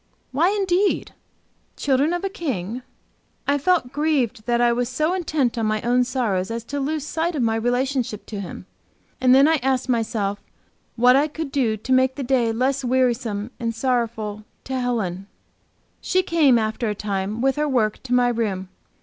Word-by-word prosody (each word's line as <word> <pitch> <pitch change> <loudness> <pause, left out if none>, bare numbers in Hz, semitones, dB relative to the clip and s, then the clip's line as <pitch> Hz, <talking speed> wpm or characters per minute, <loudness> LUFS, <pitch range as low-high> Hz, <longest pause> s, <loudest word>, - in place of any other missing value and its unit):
Why, 320 +7 +3
indeed? 390 -1 +1 0.6
Children 280 +3 +2
of 350 +1 -2
a 390 - 0
King? 250 - -4 0.7
I 285 0 +2
felt 340 -5 +1
grieved 275 -7 0
that 240 0 +2
I 240 0 +4
was 245 0 -1
so 305 +7 0
intent 305 -10 0
on 220 - 0
my 215 0 0
own 245 +1 +3
sorrows 205 -8 -1
as 230 0 -4
to 285 +4 -4
lose 295 +1 -2
sight 330 +2 -1
of 270 - 0
my 225 -1 +1
relationship 245 -1 -1
to 210 - -6
Him. 185 -1 -7 0.6
And 255 0 +6
then 275 +2 +6
I 320 0 +4
asked 265 -1 -1
myself 220 -4 0 0.6
what 250 +2 +5
I 285 +3 +3
could 310 -1 -6
do 235 -6 +1
to 255 +5 -1
make 260 0 +3
the 280 - -4
day 245 -3 +2
less 260 +4 0
wearisome 245 -4 0
and 230 -2 -2
sorrowful 225 -4 -1 0.2
to 260 -1 -3
Helen. 200 -7 -2 0.7
She 370 0 +1
came, 310 -8 +4
after 220 +1 -1
a 210 - -2
time, 200 +1 -3
with 265 +1 +2
her 300 0 0
work 220 -5 +1
to 250 -1 -4
my 245 -1 +4
room. 205 -6 -2
250 Hz, 180 wpm, -22 LUFS, 225-280 Hz, 0.7 s, And